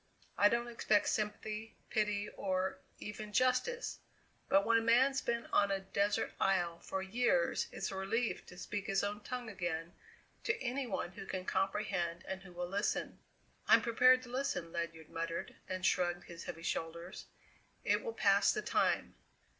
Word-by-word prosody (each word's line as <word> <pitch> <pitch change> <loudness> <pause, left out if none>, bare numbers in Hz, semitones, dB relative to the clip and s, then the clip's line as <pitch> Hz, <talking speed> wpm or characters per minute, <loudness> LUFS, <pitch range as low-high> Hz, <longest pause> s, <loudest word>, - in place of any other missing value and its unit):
I 205 - +6
don't 235 +1 0
expect 220 -3 +2
sympathy, 215 +1 -2 0.2
pity, 210 -2 +1
or 185 -1 -1 0.2
even 210 0 -6
justice, 255 - +1 0.5
but 195 +1 +5
when 230 0 +5
a - - -2
man's 260 +4 +4
been 235 0 -1
on 200 - +5
a 195 0 +1
desert 200 +2 0
isle 175 -3 +2
for 190 0 -3
years 245 - +2
it's - - -3
a - - -5
relief 220 +5 -1
to 180 - -12
speak 200 +2 -4
his 195 -1 +1
own 205 +1 -2
tongue 250 +2 -5
again 175 -4 -3 0.5
to 440 -1 +1
any 255 +2 -2
one 190 -4 -2
who 195 +1 -9
can 185 -1 -3
comprehend 190 -4 -1
and 190 0 -4
who 190 -1 -12
will 175 0 -4
listen." 200 +3 -1 0.5
"I'm - - +7
prepared 255 +2 +5
to 250 - -10
listen," 250 -10 -2
Ledyard 165 -2 -4
muttered, 165 0 -3
and 185 0 -2
shrugged 175 -1 +2
his 170 -1 -9
heavy 165 -1 -6
shoulders; 170 +3 -4 0.6
"it - - +2
will 465 - -3
pass - - +4
the - - -2
time." - - +1
200 Hz, 165 wpm, -35 LUFS, 180-235 Hz, 0.6 s, I'm